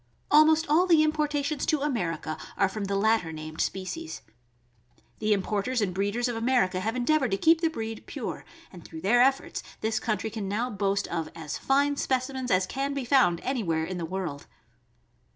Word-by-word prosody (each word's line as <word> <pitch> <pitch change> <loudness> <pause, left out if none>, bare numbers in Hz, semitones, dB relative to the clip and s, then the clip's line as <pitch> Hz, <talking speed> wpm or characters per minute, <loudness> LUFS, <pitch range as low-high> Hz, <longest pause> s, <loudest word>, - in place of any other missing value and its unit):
Almost 310 +1 +6
all 305 +4 +4
of - - -9
the 320 -3 +6
importations 300 -1 0
to 305 -3 +1
America 170 - -2 0.2
are 195 - +4
from 200 +1 -4
the 200 0 -1
latter 215 -4 +2
named 155 0 -6
species. 320 - -4 1.0
The 215 0 0
importers 210 +5 0
and 200 -4 0
breeders 205 +6 0
of 240 - -3
America 225 -6 +1
have 225 +5 -2
endeavored 260 +1 +2
to 195 - 0
keep 325 +8 +4
the 330 - +3
breed 225 -7 -6
pure, - - -5 0.3
and 175 -3 -11
through 160 - -9
their 240 +7 +4
efforts 270 +1 +1 0.2
this 220 0 0
country 220 -1 -2
can 210 -3 -4
now 235 +5 -1
boast 200 -1 0
,of 165 -2 -3
as 160 -3 -5
fine 280 +1 +2
specimens 260 -1 -1
as 185 -3 +3
can 275 +6 -3
be 275 -3 -3
found 235 -10 +3
any 265 -2 -1
where 160 -4 0
in 180 +1 -5
the - - -3
world. 170 -5 -5
225 Hz, 190 wpm, -27 LUFS, 190-275 Hz, 1.0 s, Almost